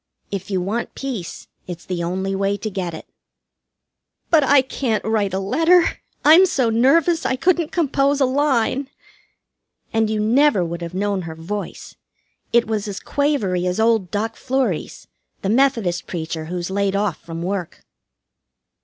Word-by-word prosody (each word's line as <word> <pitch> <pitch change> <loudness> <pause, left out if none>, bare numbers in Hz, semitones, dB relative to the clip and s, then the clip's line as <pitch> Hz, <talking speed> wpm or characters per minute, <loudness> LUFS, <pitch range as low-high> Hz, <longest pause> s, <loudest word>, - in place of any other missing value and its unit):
If 195 -1 -5
you 190 -2 0
want 210 +6 -3
peace, 245 -11 -6 0.2
it's 175 -2 -7
the 175 -2 -3
only 190 +3 -2
way 195 +1 0
to 215 +2 -5
get 180 -4 -4
it." - - -10 1.3
"But 315 -3 +5
I 275 0 +5
can't 250 -4 -2
write 215 -3 0
a 190 - -1
letter; 325 - +3 0.3
I'm 330 +6 +8
so 255 -9 +1
nervous 320 +8 +3
I - - 0
couldn't 335 +2 +1
compose 285 -3 +1
a 270 - +4
line." 265 -1 +1 1.0
And 225 -1 +2
you 215 -1 -1
never 225 -2 +3
would 170 +1 -5
have 170 +1 -6
known 200 0 -1
her 160 - -7
voice. 200 +6 -6 0.6
It 235 0 +4
was 215 -1 -2
as 200 -2 -5
quavery 210 -12 0
as 180 +3 -1
old 220 -5 +2
Doctor 220 +3 -3
Fleury's, 265 0 -2 0.4
the 195 - 0
Methodist 230 -7 +1
preacher 160 -2 -4
who's 175 +2 -4
laid 200 0 0
off 200 -5 0
from 165 0 -6
work. 185 -2 -4
210 Hz, 155 wpm, -21 LUFS, 185-270 Hz, 1.3 s, I'm